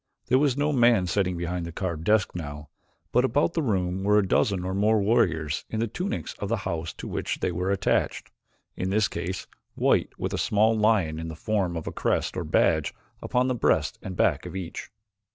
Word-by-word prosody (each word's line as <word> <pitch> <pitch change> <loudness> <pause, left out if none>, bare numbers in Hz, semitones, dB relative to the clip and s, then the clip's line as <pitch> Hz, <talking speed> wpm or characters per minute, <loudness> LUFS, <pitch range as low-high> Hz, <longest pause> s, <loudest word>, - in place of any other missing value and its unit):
There 130 +1 +5
was 140 -2 +2
no 150 +1 +1
man 120 -7 +4
sitting 90 0 0
behind 85 +1 -3
the 85 - -5
carved 85 -2 -4
desk 105 -1 +3
now, 75 -3 -7 0.4
but 125 - +3
about 145 +5 +2
the 165 - 0
room 95 -7 -1
were 105 +1 +4
a 100 -2 +2
dozen 95 -1 +1
or 95 - -2
more 105 +3 +3
warriors 95 -9 +1
in 110 - -3
the 115 - +1
tunics 180 - -4
of 100 - -3
the 115 - +1
house 85 -3 -3
to - - -8
which - - -3
they 90 - 0
were 90 +2 -2
attached, 100 -1 0 0.4
in 95 - -2
this 105 +2 +2
case 95 +2 -4 0.3
white - - +2
with - - -3
a - - -1
small 110 +2 +3
lion 105 -8 +2
in 80 - -5
the 80 - -6
form 95 -2 -1
of 80 - -5
a - - -4
crest - - -1
or - - -2
badge - - +2 0.3
upon 125 +1 +1
the 130 - +1
breast 120 - +1
and 95 -2 -7
back - - +2
of - - -8
each. 90 -3 -6
95 Hz, 210 wpm, -26 LUFS, 90-115 Hz, 0.4 s, There